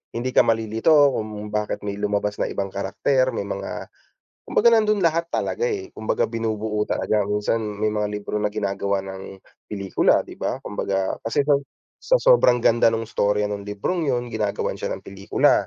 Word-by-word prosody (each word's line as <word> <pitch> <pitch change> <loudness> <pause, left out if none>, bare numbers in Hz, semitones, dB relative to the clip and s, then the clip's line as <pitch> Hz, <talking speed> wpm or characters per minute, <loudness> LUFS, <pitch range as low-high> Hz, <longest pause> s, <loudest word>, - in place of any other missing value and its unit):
hindi 125 +2 -2
ka - - +7
malilito 115 +3 +1 0.2
kung 105 -1 -5
bakit 105 0 -2
may 100 -1 -3
lumabas 105 0 -1
na - - 0
ibang 100 0 -3
karakter, 130 +7 +1
may 100 - -2
mga 100 -1 -5 0.6
kumbaga - - +4
nando'n 215 -2 +3
lahat 165 +1 +1
talaga, 475 - -1
eh. 390 -4 -4
Kumbaga 110 - 0
binubuo 110 -2 -1
talaga 110 - +1
minsan 105 +2 0
may 105 0 -2
mga 105 -1 -1
libro 105 0 -4
na 105 - +1
ginagawa 100 -1 -1
ng 95 0 -9 0.3
pelikula, 100 -2 +2
'di - - -12
ba? - - -1
Kumbaga 95 -1 -2
kasi 125 +5 +1
sa 145 - +3 0.5
sa - - +4
sobrang - - +5
ganda 115 0 +5
no'ng 115 0 -2
storya 105 -1 +1
no'ng 100 -1 -4
librong 145 - -2
'yon 120 -2 0
ginagawan 105 -2 -1
siya - - -3
ng - - -11
pelikula. 100 0 +1
105 Hz, 170 wpm, -23 LUFS, 100-120 Hz, 0.6 s, ka